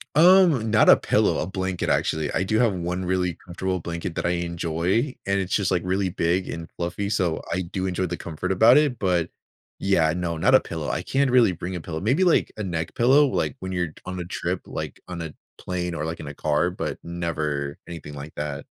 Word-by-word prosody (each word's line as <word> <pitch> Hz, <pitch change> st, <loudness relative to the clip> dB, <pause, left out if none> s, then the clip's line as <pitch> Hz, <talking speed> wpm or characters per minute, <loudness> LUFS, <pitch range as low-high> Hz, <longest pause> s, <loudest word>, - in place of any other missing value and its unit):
Um, 165 Hz, -, +6 dB
not 110 Hz, -, +5 dB
a -, -, +9 dB
pillow, -, -, +2 dB
a -, -, -1 dB
blanket, 95 Hz, -1 st, -3 dB
actually, 80 Hz, -2 st, 0 dB
I -, -, +1 dB
do 110 Hz, +3 st, 0 dB
have 115 Hz, -5 st, +3 dB
1 90 Hz, +1 st, -3 dB
really 90 Hz, -2 st, 0 dB
comfortable 95 Hz, +1 st, -4 dB
blanket 85 Hz, 0 st, -5 dB
that -, -, -2 dB
I -, -, +2 dB
enjoy, 85 Hz, -, -1 dB
and 100 Hz, 0 st, +2 dB
it's 95 Hz, -1 st, -3 dB
just, 100 Hz, -5 st, +1 dB
like, 90 Hz, -2 st, 0 dB
really 95 Hz, +1 st, 0 dB
big 90 Hz, +1 st, 0 dB
and 85 Hz, 0 st, -5 dB
fluffy, 90 Hz, +4 st, -3 dB
so, 90 Hz, -5 st, 0 dB
I 95 Hz, -, 0 dB
do 95 Hz, +2 st, -4 dB
enjoy 90 Hz, 0 st, -1 dB
the 85 Hz, -, -4 dB
comfort 85 Hz, +3 st, -4 dB
about 110 Hz, +7 st, +6 dB
it, 145 Hz, -5 st, +2 dB
but, 90 Hz, -4 st, +1 dB, 0.5 s
yeah, 85 Hz, -5 st, +2 dB
no, 85 Hz, -1 st, -2 dB
not 80 Hz, -, +4 dB
a -, -, +8 dB
pillow, 80 Hz, -3 st, -5 dB
I -, -, -2 dB
can't 135 Hz, 0 st, +1 dB
really 125 Hz, -5 st, +5 dB
bring 90 Hz, +1 st, -5 dB
a -, -, -3 dB
pillow, 80 Hz, -1 st, -5 dB
maybe, 130 Hz, -, +2 dB
like, 175 Hz, -, +3 dB
a 110 Hz, -, -3 dB
neck 85 Hz, -4 st, -3 dB
pillow, 135 Hz, +5 st, +5 dB
like, 80 Hz, -, -1 dB
when 95 Hz, 0 st, -5 dB
you're 90 Hz, -4 st, -2 dB
on 90 Hz, 0 st, -5 dB
a 90 Hz, -, -4 dB
trip, 85 Hz, -, -3 dB
like, -, -, -6 dB
on 90 Hz, -2 st, -6 dB
a 80 Hz, -, -5 dB, 0.3 s
plane 90 Hz, -1 st, -3 dB
or, 75 Hz, -2 st, -3 dB
like, 80 Hz, +1 st, -4 dB
in 75 Hz, -, -7 dB
a 70 Hz, -, -6 dB
car, 75 Hz, +5 st, 0 dB
but -, -, -4 dB
never 75 Hz, -4 st, -3 dB
anything 80 Hz, -4 st, -8 dB
like 70 Hz, +2 st, -8 dB
that. 75 Hz, -2 st, -5 dB
90 Hz, 225 wpm, -24 LUFS, 85-100 Hz, 0.5 s, a